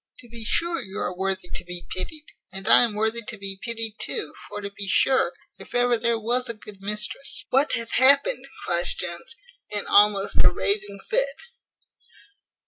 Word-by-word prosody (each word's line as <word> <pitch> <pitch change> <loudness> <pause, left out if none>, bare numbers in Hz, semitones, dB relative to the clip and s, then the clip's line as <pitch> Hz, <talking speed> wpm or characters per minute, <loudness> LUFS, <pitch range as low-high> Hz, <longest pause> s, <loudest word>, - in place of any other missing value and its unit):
To 240 - -11
be 230 0 -8
sure 335 +7 +1
you 195 -4 -8
are 180 - -3
worthy 190 -1 -2
to - - -2
be 175 0 -5
pitied, 300 +11 -5 0.3
and 195 +2 -7
I - - +8
am 235 -4 +1
worthy 220 +2 0
to 220 0 -6
be 195 -1 -5
pitied 225 -2 -2
too: 445 - -2 0.2
for, - - -6
to 200 -1 -7
be 200 0 -7
sure, 260 +7 +3 0.3
if - - -11
ever 245 0 +3
there 235 0 +1
was 240 +3 0
a 235 - 0
good 210 -2 -11
mistress 210 +6 +1
" - - -66
"What 275 +3 +3
hath 230 0 -1
happened?" 280 - +4 0.2
cries 175 0 +2
Jones, 170 - -6 0.3
in 205 -1 -4
almost 205 -1 +3
a - - +6
raving 200 -1 -2
fit. - - 0
215 Hz, 185 wpm, -24 LUFS, 195-245 Hz, 0.3 s, I